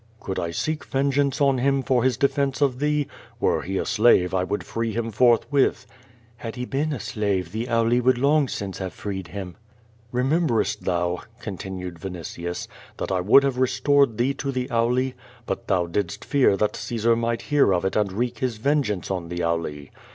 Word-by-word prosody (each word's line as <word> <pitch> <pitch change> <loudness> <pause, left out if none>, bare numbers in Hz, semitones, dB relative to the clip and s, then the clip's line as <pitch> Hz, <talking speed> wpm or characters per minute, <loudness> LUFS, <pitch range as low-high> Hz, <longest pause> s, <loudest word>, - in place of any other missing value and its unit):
"Could 95 - -4
I 85 -1 -2
seek 155 - -2
vengeance 140 +1 0
on 135 -2 +3
him 135 +1 +2
for 125 -3 +2
his 130 -1 +2
defence 140 -1 +1
of 135 -4 +1
thee? 150 0 +1 0.3
Were - - +2
he 95 +2 -3
a - - -1
slave 105 -5 +4
I 95 -1 +2
would 100 +3 -2
free 115 -1 -3
him 115 +1 -2
forthwith." 125 +4 +3 0.6
"Hjid 115 -1 -5
he 125 0 -4
been 145 +5 -1
a 140 - -3
slave 100 -6 -2
the 110 +4 -3
Auli 115 +1 +2
would 130 0 +3
long 140 +2 +3
since 95 -5 -5
have 95 -2 -4
freed 95 -3 -5
him." 90 -2 -7 0.5
"Ik'i.iemberest 125 - +1
thou," 90 0 0 0.2
continued 95 -5 -6
Vinitius, 85 -1 -5 0.3
"that - - -3
I 95 -1 +1
would 110 +9 +6
liave 135 -2 0
restored 140 -2 +3
thee 130 +3 +1
to 140 0 -3
the 130 -1 -2
Auli? 125 +3 +1 0.3
lUit - - -3
thou 90 -2 +2
didst 85 0 -3
fear 135 -8 +3
that 105 - 0
Caesar 115 0 +1
might 115 0 -1
hear 145 -8 +5
of 90 0 +1
it 95 - -1
and 105 -3 +1
wreak 120 +3 -2
his 125 -4 -1
vengeance 115 -7 0
on 90 -3 -3
the 85 0 -3
Auli. 80 -4 -2
115 Hz, 190 wpm, -24 LUFS, 95-135 Hz, 0.6 s, would